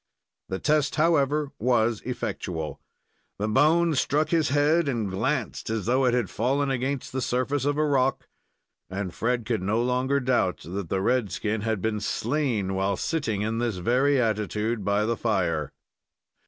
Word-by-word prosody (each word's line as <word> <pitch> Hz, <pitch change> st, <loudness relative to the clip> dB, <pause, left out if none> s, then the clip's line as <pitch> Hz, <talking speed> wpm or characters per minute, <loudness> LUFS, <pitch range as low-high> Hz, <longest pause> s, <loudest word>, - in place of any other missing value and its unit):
The 95 Hz, -, -2 dB
test, 150 Hz, +4 st, +1 dB
however, 150 Hz, -2 st, +2 dB
was 115 Hz, -2 st, +2 dB
effectual. 100 Hz, -10 st, -4 dB, 0.6 s
The 105 Hz, -, -1 dB
bone 160 Hz, +9 st, +3 dB
struck 150 Hz, +2 st, +1 dB
his 160 Hz, -4 st, +2 dB
bead, 145 Hz, +3 st, +3 dB
and 110 Hz, -7 st, -1 dB
glanced 95 Hz, -, -2 dB
as 110 Hz, -3 st, -2 dB
though 130 Hz, +3 st, +2 dB
it 125 Hz, -1 st, +3 dB
had 120 Hz, -5 st, +1 dB
fallen 135 Hz, +4 st, 0 dB
against 135 Hz, +1 st, -2 dB
the 130 Hz, -, -2 dB
surface 130 Hz, +3 st, 0 dB
of 145 Hz, 0 st, +1 dB
a 155 Hz, -, +2 dB
rock, 135 Hz, -2 st, +1 dB, 0.6 s
and 95 Hz, -1 st, -4 dB
Fred 120 Hz, 0 st, -1 dB
could 110 Hz, -2 st, -1 dB
no 105 Hz, +5 st, 0 dB
longer 130 Hz, +3 st, +1 dB
doubt 125 Hz, -8 st, +1 dB
that 90 Hz, 0 st, -5 dB
the 95 Hz, -, 0 dB
red 125 Hz, -3 st, +1 dB
skin 105 Hz, 0 st, -2 dB
had 110 Hz, -3 st, -2 dB
been 110 Hz, -1 st, 0 dB
slain 115 Hz, -3 st, -1 dB
while 95 Hz, 0 st, 0 dB
sitting 115 Hz, -11 st, -1 dB
in 110 Hz, +1 st, -1 dB
this 120 Hz, -5 st, -1 dB
very 130 Hz, +9 st, +2 dB
attitude 110 Hz, -1 st, -1 dB
by 100 Hz, +2 st, +1 dB
the 115 Hz, +1 st, 0 dB
fire. 85 Hz, -10 st, 0 dB
120 Hz, 165 wpm, -26 LUFS, 105-140 Hz, 0.6 s, bone